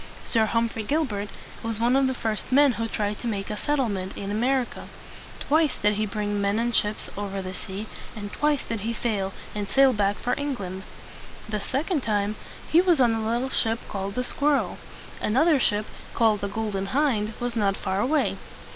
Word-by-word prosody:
Sir 220 -2 +2
Hum 230 +1 +2
phrey 220 -2 -6
Gilbert 240 -10 0 0.3
was 225 -1 -3
one 240 +3 +3
of 270 0 +4
the 260 - -1
first 220 -1 -2
men 280 +1 +6
who 230 -1 -2
tried 210 -1 -2
to 240 - -4
make 200 -2 -2
a - - -2
set 290 +7 0
tle 270 -4 +1
ment 190 -2 -4
in 200 0 -4
A - - -1
mer 255 +5 +2
i - - -2
ca. - - -10 0.5
Twice 310 -1 +2
did 210 0 +3
he 215 +1 0
bring 205 0 -1
men 200 +1 +1
and 235 +1 0
ships 210 +1 +1
over 200 -1 -3
the 185 -1 -5
sea, 190 +3 -6 0.3
and 205 -2 -6
twice 295 -2 +1
did 230 -1 -3
he 225 +3 -2
fail, 210 -4 -1 0.2
and 205 -1 -3
sail 270 +3 +5
back 205 -2 +1
for 245 - -1
England. 200 -10 -3 0.7
The 215 -1 -2
second 290 - -1
time, 210 -2 0 0.3
he 335 - +6
was 355 -5 +3
on 240 -3 +5
a 225 0 -1
little 240 +4 0
ship 225 -2 +1
called 195 0 -4
the 250 - 0
"Squirrel." 285 +3 +1 0.4
Another 285 +7 +4
ship, 210 -3 +1 0.3
called 220 -3 +3
the 200 - -1
"Golden 200 -2 -2
Hind," 230 -4 +1
was 240 0 -2
not 200 -3 +2
far 190 +1 -1
away. 290 +8 +1
220 Hz, 210 wpm, -26 LUFS, 205-260 Hz, 0.7 s, men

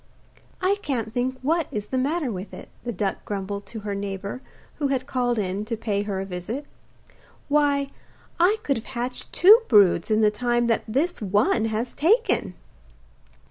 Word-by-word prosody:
'I 390 +2 +3
can't 230 - -2
think 255 +1 -1
what 325 +2 +1
is 210 -1 -5
the 260 - -1
matter 285 0 0
with 190 0 -6
it,' - - -11
the 240 - -3
duck 195 -2 -2
grumbled 200 0 -4
to 225 -2 -7
her 205 0 -3
neighbour 200 +3 -4 0.4
who 290 - +1
had 265 -2 -1
called 245 -2 0
in 195 0 -1
to 230 0 -3
pay 205 -2 -1
her 200 -2 -3
a 190 - -3
visit. 195 +10 -5 0.8
'Why 285 -1 +2 0.5
I 370 +6 +4
could 275 - +1
have 225 - -7
hatched 250 0 -5
two 420 +7 +7
broods 195 -6 +5
in 215 0 +3
the 210 -1 +4
time 240 +2 +1
that 230 -1 +1
this 285 +10 -1
one 210 +3 +2
has 225 +2 -2
taken! 335 - +2
235 Hz, 175 wpm, -24 LUFS, 205-275 Hz, 0.8 s, two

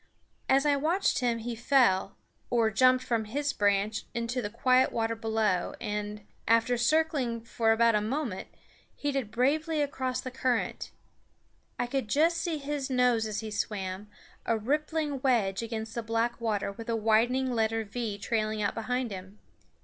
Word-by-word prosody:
As 270 +2 +4
I 290 -1 +4
watched 335 +7 +1
him 240 -2 +1
he 235 +1 -4
fell, 225 -6 +2 0.3
or 230 -2 +2
jumped 255 +3 +4
from 230 -3 -1
his 285 +6 -2
branch 205 +1 +1
into 235 +2 -1
the 205 - -3
quiet 255 +3 +3
water 225 0 0
below 220 -5 0
and, 210 0 -4 0.2
after 230 +2 +3
circling 275 -1 +1
about - - -22
for 225 -1 +2
a 225 -1 +4
moment, 230 -2 -3 0.6
headed 275 -6 -1
bravely 305 +7 +1
across 260 -3 -1
the 255 - -5
current. 250 -2 -1 0.9
I - - 0
could 260 -1 -2
just 325 +8 +3
see 335 -3 -1
his 285 -1 -3
nose 250 -3 +2
as 215 0 -3
he 220 -1 -6
swam, 200 -1 -3 0.3
a 230 - +1
rippling 295 +4 -1
wedge 225 -8 +2
against 225 -1 -5
the 235 - -2
black 230 +1 -1
water 210 -3 -1
with 225 +3 -9
a 230 - +1
widening 230 +4 +2
letter 225 -1 0
V 215 0 -4
trailing 215 0 -1
out 205 -1 0
behind 245 +1 -2
him. 190 +1 -8
230 Hz, 160 wpm, -29 LUFS, 215-260 Hz, 0.9 s, As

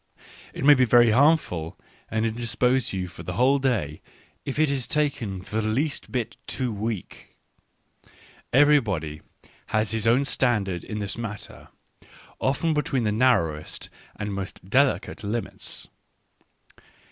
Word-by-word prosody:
It - - -6
may 145 - +9
be 130 -2 +4
very 120 -1 +6
harmful, 130 - +2 0.3
and 110 0 0
indis 115 0 -3
pose 125 0 +2
you 95 -1 -3
for 90 - -11
the 90 - -5
whole 130 +8 +3
day, 105 - -1 0.4
if 135 - -4
it 155 +1 +4
be 140 -1 0
taken 130 -8 -1
the 110 +3 -3
least 130 +8 -1
bit 120 -3 -3
too 125 -3 -2
weak. 105 -2 -5 1.1
Everybody 110 - +3 0.5
has 110 0 0
his 115 -1 -1
own 125 +5 +4
standard 105 - 0
in 105 - -5
this 100 +2 -4
matter, 105 -3 -7 0.7
often 150 +5 +1
between 135 -4 0
the 105 - +1
narrowest 105 -10 +1 0.2
and 105 0 -4
most 95 -1 -6
delicate 135 +1 +1
limits. 110 +3 -4
115 Hz, 135 wpm, -25 LUFS, 100-130 Hz, 1.1 s, may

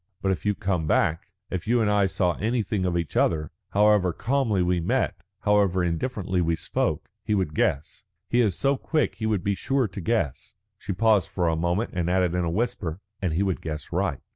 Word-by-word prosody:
But 95 - 0
if 95 - -2
you 105 - +2
come 90 -5 -1
back, 80 0 +1 0.2
if 90 0 -3
you 120 +2 +3
and 110 - +2
I 105 -1 +3
saw 90 -2 +1
anything 105 -3 0
of 85 -1 0
each 85 -3 -3
other, 75 -2 +1 0.2
however 105 -3 +4
calmly 115 -2 0
we 90 0 +1
met, 85 - 0 0.3
however 100 -3 +3
indifferently 95 +1 -1
we 85 -1 +1
spoke, - - -2 0.2
he 105 - 0
would 90 -6 -1
guess. 70 0 -1 0.2
He 120 - +3
is 100 -6 +1
so 135 0 +2
quick 155 -2 0
he 110 0 -2
would 105 -5 0
be 100 - +1
sure 135 +4 0
to 95 0 -7
guess." 105 - -1 0.2
She - - -5
paused 105 -1 +3
for 90 -2 0
a 80 - +2
moment, 85 +7 0
and 90 -2 -1
added 90 -1 +2
in 90 0 0
a 85 - 0
whisper, 100 -4 -2 0.2
"And 90 -5 0
he 90 +5 +1
would 95 -3 -1
guess 75 -1 -6
right." 85 -5 0
95 Hz, 210 wpm, -25 LUFS, 85-105 Hz, 0.3 s, however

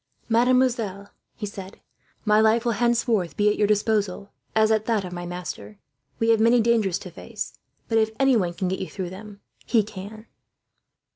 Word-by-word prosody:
"Mademoiselle," 235 -4 +2 0.3
he 215 - -5
said, 195 -1 -9 0.5
"my 210 0 +4
life 225 +2 +3
will 235 - +2
henceforth 230 -5 +1
be 210 0 +4
at 210 - +1
your 210 - +2
disposal, 205 -2 0 0.2
as 220 0 +4
at 215 -1 +2
that 220 -5 +1
of 180 - -7
my 175 0 -5
master. 155 - -7 0.4
We 225 0 +4
may 225 +2 +4
have 235 - +4
dangers 220 -6 +2
to 180 - -10
face, 170 - -7 0.3
but 225 -1 +2
if 220 0 +2
anyone 230 -11 +2
can 185 - -2
get 190 +1 -2
you 190 - -5
through 185 -3 -5
them, 200 +1 -11 0.2
he 225 -3 +2
can." 210 +2 -9
210 Hz, 180 wpm, -24 LUFS, 190-225 Hz, 0.5 s, my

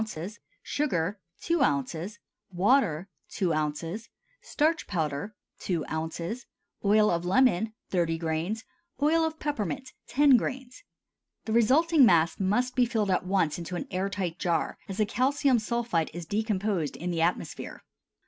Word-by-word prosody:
Sugar 200 - -1 0.2
2 335 -2 +1
oz. 165 - 0 0.3
Water 190 - +2 0.2
2 180 -4 0
oz. 155 +8 -3 0.3
Starch 315 +2 0
powder 160 +2 -2 0.2
2 170 -5 -2
oz. 165 +9 -4 0.4
Oil 210 +1 +4
of 170 0 0
lemon 220 +1 +3 0.2
30 170 -3 +1
grains. 165 +7 -2 0.4
Oil 315 +3 +3
of 320 0 -2
peppermint 265 -1 -3 0.2
10 280 -1 +5
grains. 260 +8 -5 0.6
The 220 - -2
resulting 285 +7 +5
mass 170 -7 +4
must 215 +7 +1
be 250 -1 +4
filled 215 -4 0
at 185 0 0
once 180 -5 +1
into 170 +1 -5
an - - -3
air 185 +2 -1
tight 185 -4 -3
jar, 170 -2 -1
as 195 - -5
the 215 - +3
calcium 260 +3 +2
sulphide 225 -7 -1
is 175 -1 -5
decomposed 205 - -1
in 180 +1 -3
the 165 -1 -1
atmosphere. 170 +2 -2
200 Hz, 140 wpm, -28 LUFS, 170-250 Hz, 0.6 s, 10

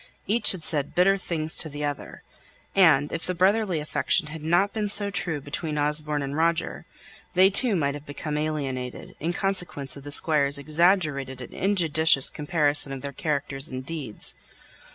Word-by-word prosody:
Each 230 +4 +5
had 180 -4 -7
said 145 -3 -1
bitter 190 +2 +3
things 160 -4 -3
to 160 - +3
the 145 0 -5
other; 145 -1 -7 0.5
and, 155 -7 +3
if 165 - -4
the 180 - -3
brotherly 190 -1 +1
affection 150 +2 +1
had 155 0 -8
not 175 +6 +1
been 210 -2 -3
so 205 0 +3
true 165 -6 -3
between 150 +2 -5
Osborne 150 0 +1
and 140 +1 -5
Roger, 165 +1 -2 0.5
they 190 +2 +5
too 230 +1 +4
might 140 -5 -1
have 145 +1 -10
become 150 +1 -6
alienated, 140 -5 -5
in 165 +3 -2
consequence 175 -8 0
of 140 - -12
the 145 - -9
Squire's 145 -1 +3
exaggerated 150 -3 0
and 125 - -10
injudicious 160 -7 +2
comparison 145 -2 +2
of 135 -1 -7
their 140 0 -6
characters 140 -1 -1
and 130 0 -7
deeds. 145 -9 -5
155 Hz, 170 wpm, -24 LUFS, 145-175 Hz, 0.5 s, Each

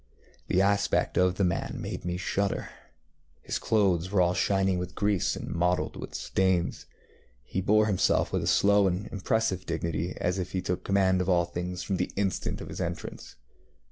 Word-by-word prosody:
The 95 - +3
aspect 100 0 +1
of 90 0 +3
the 100 - 0
man 90 -2 -1
made - - -5
me 90 0 -2
shudder. 100 +2 -1 0.7
His - - -2
clothes 95 -5 +2
were 100 -1 +1
all 90 0 +4
shining 95 0 +1
with 90 0 -5
grease 100 -3 +1
and - - -6
mottled 90 +1 0
with - - -7
stains. 95 -2 0 0.6
He 95 - -3
bore 110 +3 +4
himself 100 -4 +1
with - - +1
a - - -3
slow 100 0 +4
and 95 +3 -1
impressive 100 -1 0
dignity, 85 +1 -2
as 90 +2 0
if 90 - -4
he 95 - 0
took 90 0 -2
command 95 -2 +2
of 90 - -1
all 85 -2 +3
things 90 +1 -4
from 95 -1 -1
the - - -1
instant 95 -2 -1
of - - -8
his - - -5
entrance. - - -5
95 Hz, 180 wpm, -28 LUFS, 90-100 Hz, 0.7 s, all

